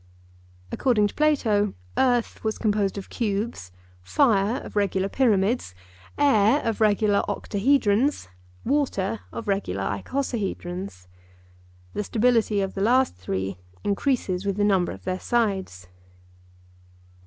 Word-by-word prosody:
According 235 -6 +2
to - - -11
Plato 225 -10 +2 0.2
earth 245 -3 +1
was 220 -1 -1
composed 205 -3 0
of 195 - -7
cubes, 205 - -3 0.3
fire 220 - +2
of - - -11
regular 195 -2 +1
pyramids, 210 - +1 0.4
air 260 -2 +4
of 225 -1 -2
regular 210 -1 +3
octahedrons, 235 - +1 0.4
water 230 -7 0
of 230 - -7
regular 195 - -1
icosahedrons. 180 - -4 0.9
The 210 - -2
stability 225 -2 +2
of 195 -1 -3
the 195 - -4
last 250 +5 +3
three 95 +1 -4 0.2
increases 200 -4 0
with 200 -1 -2
the 205 - +1
number 195 -3 +2
of - - -10
their 185 0 -2
sides. 195 - -1
205 Hz, 115 wpm, -25 LUFS, 190-240 Hz, 0.9 s, air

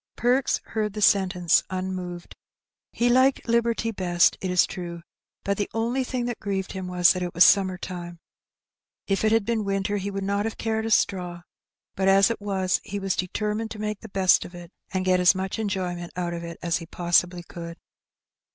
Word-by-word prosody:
Perks 250 +3 +1
heard 215 -2 -2
the 210 - -5
sentence 185 -4 +3
unmoved. 185 -2 -5 0.6
He 240 - 0
liked 260 +2 +3
liberty 230 -1 +1
best, 175 -4 +2
it 185 - -2
is 180 -1 +4
true, 170 -2 -7 0.4
but 200 0 -1
the 205 - -2
only 235 +4 0
thing 250 -1 -3
that 240 -1 -4
grieved 195 -2 -3
him 190 -1 -5
was 180 -1 +4
that 185 - -4
it 175 -1 -4
was 170 - +7
summer 190 -2 +4
time. 175 -1 -7 0.9
If 195 +1 0
it 215 - +3
had 225 -2 +3
been 225 -1 0
winter, 195 +1 -1
he 200 0 -3
would 195 -1 -4
not 200 +1 -1
have 225 - -4
cared 220 0 -1
a - - -2
straw; 180 -5 0 0.5
but 190 0 0
as 195 +3 +5
it 225 - -5
was 190 -2 0
he 205 -1 -5
was 195 -1 -1
deter 210 +3 -2
mined 220 +1 -3
to 215 - -8
make 210 -1 -3
the 225 - -11
best 190 -1 +3
of 175 - -11
it, 175 0 -11 0.2
and 185 -1 -1
get 185 0 +3
as 180 +1 +5
much 190 +3 -3
enjoyment 180 -4 -3
out 175 -1 -2
of 170 0 -5
it 170 -1 -7
as 170 -2 +1
he 165 - -9
possibly 175 +1 +1
could. 170 -1 -9
190 Hz, 205 wpm, -25 LUFS, 180-215 Hz, 0.9 s, was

